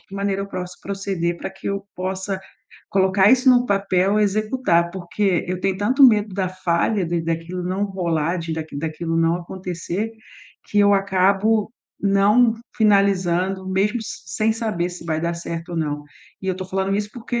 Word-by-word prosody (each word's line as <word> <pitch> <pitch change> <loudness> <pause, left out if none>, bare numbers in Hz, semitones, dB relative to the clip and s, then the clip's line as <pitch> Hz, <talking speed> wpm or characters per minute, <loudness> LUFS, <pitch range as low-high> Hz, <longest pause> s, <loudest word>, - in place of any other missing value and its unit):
que 195 - -14
maneira 195 0 -1
eu - - -5
pros 180 -2 -5
proceder 195 -3 -2
pra 170 - -5
que 195 0 -11
eu 200 0 -3
possa 190 +1 -3 0.5
colocar 190 +1 +4
isso 260 0 +5
no 245 0 +4
papel 195 0 +2
e - - +4
executar. 210 -4 +1
Porque 190 0 -1
eu 180 0 -2
tenho 195 0 0
tanto 250 +8 +2
medo 210 -3 +3
da 190 -1 0
falha, 185 +2 0
de 170 0 -1
daquilo 165 +2 -3
não 185 +3 -1
rolar, 170 -4 -1
de 165 -1 -4
daqui 160 -2 -6
daquilo 165 +1 -3
não 165 0 +3
acontecer, 180 +3 -4 0.6
que 205 - 0
eu 205 0 +6
acabo 200 +3 +2 0.3
não 210 +4 +4 0.2
finalizando, 195 -3 +2
mesmo 195 +5 +1
sem 220 0 -2
saber 215 -6 -2
se 175 -1 -9
vai 160 -1 -1
dar 170 +1 -1
certo 170 0 -6
ou 170 - -4
não. 150 -2 -2 0.4
E - - -5
eu 185 - +1
tô 185 - -5
falando 190 +1 -1
isso, 205 +1 -1
porque 240 0 -3
190 Hz, 175 wpm, -22 LUFS, 175-205 Hz, 0.6 s, eu